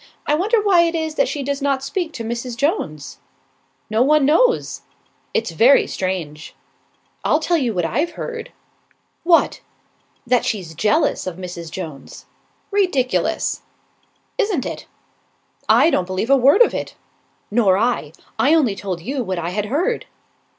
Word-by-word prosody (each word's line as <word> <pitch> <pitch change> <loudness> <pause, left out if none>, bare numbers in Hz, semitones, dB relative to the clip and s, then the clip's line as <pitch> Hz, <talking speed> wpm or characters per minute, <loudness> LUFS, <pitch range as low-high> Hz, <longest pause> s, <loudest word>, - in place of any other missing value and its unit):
I - - +1
wonder 415 +9 +2
why 400 -4 +4
it 335 0 +1
is 320 -1 -2
that - - +1
she 285 - -3
does 280 +1 -3
not 275 -1 0
speak 340 +3 -3
to 230 - -6
Mrs. 235 +1 -4
Jones." 155 - -2 0.7
"No 220 +2 0
one 295 +2 +4
knows." 470 - +2 0.5
"It's 225 -6 -1
very 235 - +5
strange." 170 -5 -4 0.7
"I'll 305 - +2
tell 335 +1 +1
you 250 -5 0
what 175 -2 0
I've 300 - -1
heard." 465 -1 -6 0.7
"What?" 335 -1 +3 0.6
"That 245 0 +2
she's 185 -7 -3
jealous 215 - +1
of 180 - -4
Mrs. 175 -3 -7
Jones." 160 -5 -8 0.5
"Ridiculous!" 360 -11 0 0.8
"Isn't 400 - 0
it." - - -6 0.8
"I 335 - +5
don't 180 - 0
believe 185 +7 -2
a - - +8
word 275 - +6
of - - -1
it." - - -5 0.6
"Nor 205 -4 +3
I. 220 -9 0 0.3
I 295 +4 +4
only 255 -11 +2
told 185 -4 -5
you 265 +4 -2
what 185 -4 -3
I 170 +1 -3
had 210 +2 -2
heard." 345 - -1
255 Hz, 150 wpm, -20 LUFS, -, 0.8 s, a